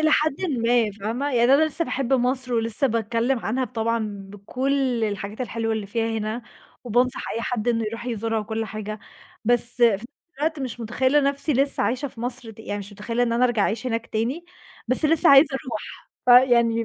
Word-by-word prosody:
الي 310 0 +3
حدٍ 305 -2 +2 0.2
ما 230 -2 +2
فاهمة؟ 225 +8 -3
يعني 240 +2 +5
أنا 310 - +5
لسه 315 +2 -1
باحب 270 -2 -2
مصر 250 0 +1
ولسه 230 +4 +1
باتكلّم 230 +2 0
عنها 245 +3 -1
بطبعًا 225 -4 -2
بكل 250 +3 -1
الحاجات 205 +2 -4
الحلوة 225 -1 -2
اللي 215 -2 -3
فيها 225 +1 -1
هنا، 215 +3 -3 0.4
وبانصح 245 +2 0
أي 230 - -2
حد 240 -1 -2
إنّه 230 -1 +1
يروح 230 +3 -5
يزورها 225 -1 -1
وكل 220 +1 -3
حاجة، 215 0 -6 0.5
بس 240 +1 +1
في - - +10
نفْس 200 +4 -4 0.3
الوقت 310 0 -1
مش 250 -2 -5
مُتخيلة 260 +5 +2
نفْسي 280 +2 0
لسه 275 +2 +1
عايشة 255 +4 -1
في 230 - -13
مصر، 240 -2 -4
يعني 205 -2 -4
مش 200 +1 -9
مُتخيلة 230 +4 -2
إن 235 -1 +1
أنا 245 +2 +3
أرجع 235 -4 +2
أعيش 230 +5 -1
هناك 230 -1 -2
تاني، 250 +10 -2 0.4
بس 255 +5 0
لسه 325 +2 +4
عايزة 275 +2 +8
أروح، 255 -2 -6 0.2
فيعني 240 -2 +5
235 Hz, 185 wpm, -24 LUFS, 220-260 Hz, 0.5 s, في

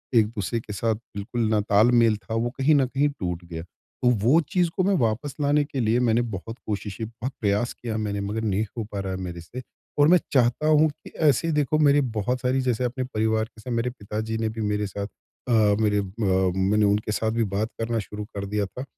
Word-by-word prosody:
एक-दूसरे 110 0 +1
के 105 -2 -8
साथ 110 +2 0
बिल्कुल 115 +1 -6
ना 110 -1 +3
तालमेल 110 +2 +4
था, 110 - -8
वो 115 +1 0
कहीं 140 +3 +4
न 135 -2 +4
कहीं 140 +3 +1
टूट 90 - -4
गया। 80 -1 -6
तो 125 +7 -4
वो 145 +8 +5
चीज़ 180 -2 +2
को 185 - +3
मैं 200 +2 +2
वापस 120 +4 0
लाने 145 +1 +3
के 140 -2 -5
लिए 115 +1 +2
मैंने 115 +1 +3
बहुत 115 +5 -7
कोशिशें 105 +1 -3
बहुत 115 +4 -6
प्रयास 105 +3 +1
किया 115 -2 -4
मैंने 100 -1 -2
मगर 110 +2 -2
नहीं 105 -1 +1
हो 115 - -1
पा 100 - -3
रहा 95 -1 -3
है 95 - -4
मेरे 85 -2 -6
से 120 +10 -8 0.4
और 145 - +6
मैं 180 - +7
चाहता 125 +3 +3
हूँ 155 0 +5
कि 145 - -13 0.2
ऐसे 145 +3 +3
ही 165 - +1
देखो 150 +1 +1
मेरी 145 -1 +5 0.2
बहुत 125 +5 -1
सारी 130 +1 +1
जैसे 125 -2 0
अपने 130 +1 -2
परिवार 110 -2 0
के 110 -1 -17
साथ 125 - -6
मेरे 115 +2 0
पिताजी 110 -1 -4
ने 110 0 -1
भी 110 +1 -5
मेरे 105 0 0
साथ 100 +1 -5 0.4
अ, - - +1 0.3
मेरे 105 -1 +2
अ, - - 0 0.5
मैंने 105 +3 +3
उनके 105 +1 +1
साथ 110 +1 0
भी 115 0 +1
बात 110 +2 0
करना 115 0 -1
शुरू 105 0 -6
कर 100 0 -3
दिया 105 0 -1
था। 125 +7 -7
115 Hz, 230 wpm, -25 LUFS, 105-130 Hz, 0.5 s, मैं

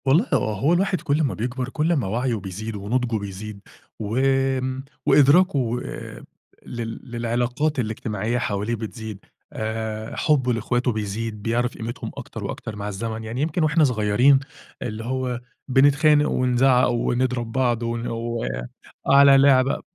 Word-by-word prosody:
والله 155 - +4
آه، 110 - +1
هو 150 +5 +3
الواحد 185 0 +1
كلّ 145 +2 +1
ما 135 - 0
بيكبَر 125 +3 -3
كلّ 155 +5 0
أمّا 140 - +1
وعيه 120 +4 0
بيزيد 105 +2 -6
ونُضجه 115 +3 -1
بيزيد 100 +1 -7 0.4
وآمم 130 +3 0 0.2
وإدراكه 150 +3 +5
و 120 -1 -1 0.9
لل 115 -1 -5
للعلاقات 120 +5 -1
الإجتماعية 110 0 -2
حواليه 110 -1 -1
بتزيد 110 -2 -7 0.3
آآ، 110 0 -4
حُبّه 130 -5 +2
لإخواته 120 +2 0
بيزيد، 105 0 -4
بيعرَف 120 +3 -1
قيمتهم 115 +2 -5
أكتر - - -7
وأكتر 110 - -5
مع 105 0 -5
الزمن، 110 +2 -4
يعني 115 +4 -4
يمكن 160 +2 0
وإحنا 155 +1 +3
صغيّرين 125 +2 +4 0.4
اللي 110 -2 -4
هو 130 -1 -2 0.3
بنتخانق، 145 +3 +4
ونزعّق، 125 0 +3
ونضرَب 120 0 0
بعض، 120 -2 +1
ون 115 0 -2
و 115 +1 -3
آه - - -4 0.5
على 140 0 +8
لعبة 135 -1 +4
120 Hz, 140 wpm, -23 LUFS, 110-135 Hz, 0.9 s, على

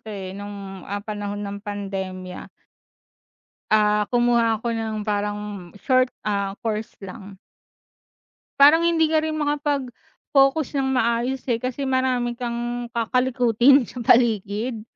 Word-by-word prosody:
'to - - -13
eh, 190 -2 -6
nung, 200 -1 -8
ah, 200 +1 -4
panahon 205 -1 -4
ng 200 0 -6
pandemya. 195 -3 -6 1.2
Ah, 210 -1 +3
kumuha 240 -2 +2
ako 230 +2 -3
ng 220 -2 -3
parang 205 0 -1 0.4
short, 255 -1 +4 0.2
ah, 200 -2 -1
course 220 -1 -3
lang. 195 +1 -10 1.2
Parang 300 +4 +8
hindi 335 -1 +3
ka 315 0 +2
rin 315 0 -2
makapag-focus 285 0 0
ng 265 - 0
maayos 240 +2 0
eh. 235 -3 -1
Kasi 255 +2 -3
marami 255 -2 0
kang 240 0 -4
kakalikutin 245 +2 +3
sa 245 - -8
paligid 225 0 +2
230 Hz, 120 wpm, -23 LUFS, 205-255 Hz, 1.2 s, Parang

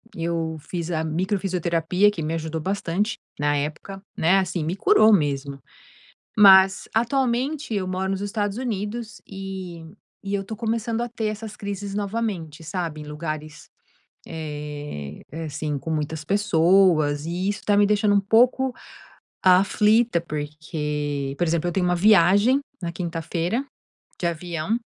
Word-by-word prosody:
eu 165 -1 -2
fiz 170 +2 -5
a 160 -2 -1
microfisioterapia 180 +1 +1
que 175 -6 -4
me 155 +2 -2
ajudou 160 0 -4
bastante 195 +3 -1 0.2
na 145 0 +1
época, 155 +7 -5 0.2
né, 180 +4 +4
assim, 180 -3 -2
me 165 +4 -2
curou 220 - +5
mesmo. 140 -6 +1 0.8
Mas 190 -2 +7
atualmente 255 +3 0
eu 195 -2 -1
moro 190 +1 -2
nos 195 0 -2
Estados 205 +1 -2
Unidos 225 -1 -4
e 190 -3 -7 0.4
e 200 - -2
eu 200 - 0
tô 215 +3 -7
começando 230 +1 -1
a 240 - -2
ter 225 -2 -3
essas 215 0 -5
crises 200 -1 -5
novamente, 200 -7 -3
sabe, 165 -2 -4
em - - -8
lugares, 155 0 -6 0.6
eh, 150 - -6
é 165 +2 -5
assim, 150 0 -3
com 160 +4 -5
muitas 155 0 -2
pessoas, 170 -6 +3
e 180 +3 -2
isso 205 - -3
tá 205 -1 +2
me 205 - +6
deixando 210 0 +3
um - - +5
pouco 245 +6 +3 0.7
aflita, 210 +3 +4
porque, 150 -3 -4
por 175 - +1
exemplo, 170 +1 0
eu - - -2
tenho 185 +1 0
uma 180 0 +2
viagem 205 +6 +5 0.2
na 170 - -3
quinta-feira, 170 - -2 0.6
de 175 - 0
avião 170 +4 -2
180 Hz, 145 wpm, -24 LUFS, 160-205 Hz, 0.8 s, Mas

